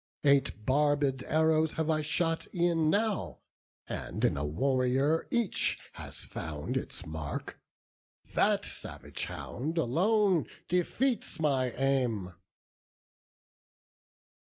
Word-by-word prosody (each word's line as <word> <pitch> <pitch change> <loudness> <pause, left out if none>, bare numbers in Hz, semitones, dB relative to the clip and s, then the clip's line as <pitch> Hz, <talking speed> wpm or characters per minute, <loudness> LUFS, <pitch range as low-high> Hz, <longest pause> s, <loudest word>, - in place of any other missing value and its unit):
Eight 140 -6 +3
barbed 145 -1 +2
arrows 160 0 +3
have 160 0 0
I 155 -1 +1
shot 165 +2 0
e'en 170 -2 +2
now, 210 +2 0 0.5
And - - -2
in - - +2
a 70 - -2
warrior 130 - +1
each 235 -5 +1 0.2
has - - -6
found 75 -2 -5
its - - -3
mark; 75 -2 -5 0.7
That - - +3
savage - - -5
hound 155 +7 -5
alone 180 - +3 0.2
defeats 185 +3 0
my 135 -5 +2
aim." 125 -9 0
150 Hz, 100 wpm, -30 LUFS, 130-165 Hz, 0.7 s, Eight